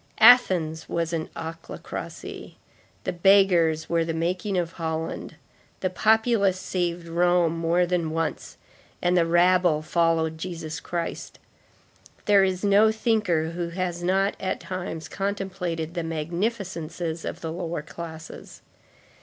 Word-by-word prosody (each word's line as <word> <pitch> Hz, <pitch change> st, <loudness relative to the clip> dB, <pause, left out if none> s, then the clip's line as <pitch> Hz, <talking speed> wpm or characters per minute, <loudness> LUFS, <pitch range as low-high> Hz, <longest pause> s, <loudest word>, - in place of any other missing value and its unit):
Athens 185 Hz, -10 st, +5 dB
was 170 Hz, 0 st, -1 dB
an 160 Hz, -1 st, -2 dB
ochlocracy; 165 Hz, 0 st, -7 dB, 0.5 s
the -, -, -2 dB
beggars 175 Hz, -4 st, +4 dB
were 170 Hz, -1 st, +1 dB
the 165 Hz, 0 st, -3 dB
making 180 Hz, +4 st, -1 dB
of 170 Hz, -2 st, -1 dB
Holland; 160 Hz, -1 st, -4 dB, 0.5 s
the 185 Hz, -, 0 dB
populace 220 Hz, -2 st, +3 dB
saved 175 Hz, -2 st, -2 dB
Rome 175 Hz, 0 st, +2 dB
more 170 Hz, +2 st, +2 dB
than 175 Hz, -2 st, 0 dB
once; 165 Hz, 0 st, -3 dB, 0.4 s
and 175 Hz, +1 st, +2 dB
the 170 Hz, -2 st, +3 dB
rabble 175 Hz, -2 st, +3 dB
followed 160 Hz, -1 st, +1 dB
Jesus 165 Hz, -3 st, -5 dB
Christ. 170 Hz, -1 st, -5 dB, 0.9 s
There 200 Hz, -2 st, +5 dB
is 190 Hz, 0 st, -1 dB
no 205 Hz, +2 st, +5 dB
thinker 210 Hz, -8 st, +1 dB
who 170 Hz, 0 st, -3 dB
has 175 Hz, 0 st, -3 dB
not 195 Hz, +3 st, +2 dB
at 185 Hz, -, -2 dB
times 175 Hz, -4 st, -5 dB
contemplated 190 Hz, -5 st, -3 dB
the 175 Hz, -, -2 dB
magnificences 170 Hz, 0 st, -3 dB
of -, -, -5 dB
the 160 Hz, -, -4 dB
lower 170 Hz, -2 st, -4 dB
classes. 160 Hz, 0 st, -9 dB
175 Hz, 125 wpm, -25 LUFS, 165-185 Hz, 0.9 s, Athens